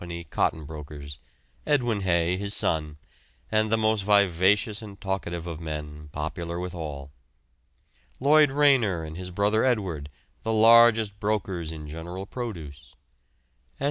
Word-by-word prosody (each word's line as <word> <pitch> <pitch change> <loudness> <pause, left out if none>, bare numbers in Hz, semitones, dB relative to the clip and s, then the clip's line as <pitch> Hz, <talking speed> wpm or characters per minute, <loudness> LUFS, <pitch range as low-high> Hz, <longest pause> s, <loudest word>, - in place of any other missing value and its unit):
cotton 80 -2 0
brokers; 75 -2 -9 0.4
Edwin 120 -8 +1
Haigh, 85 -1 +1
his 100 +2 -1
son, 75 -2 0 0.5
and 110 0 +2
the 110 - +4
most 110 -1 +2
vivacious 100 +2 +3
and 100 -3 -10
talkative 90 -3 -3
of 85 -2 -6
men, 75 -1 -6
popular 85 +3 -4
with 90 0 -5
all; 70 -5 -6 1.1
Lloyd 150 +2 +5
Rayner 135 - +3
and 80 0 -7
his 90 +1 -6
brother 105 +4 +1
Edward, 95 - -1 0.3
the 110 - -1
largest 110 -2 +5
brokers 95 -6 -2
in 80 -2 -8
general 85 +5 -7
produce; 80 - -7 0.8
S. - - -33
95 Hz, 130 wpm, -26 LUFS, 80-110 Hz, 1.1 s, Lloyd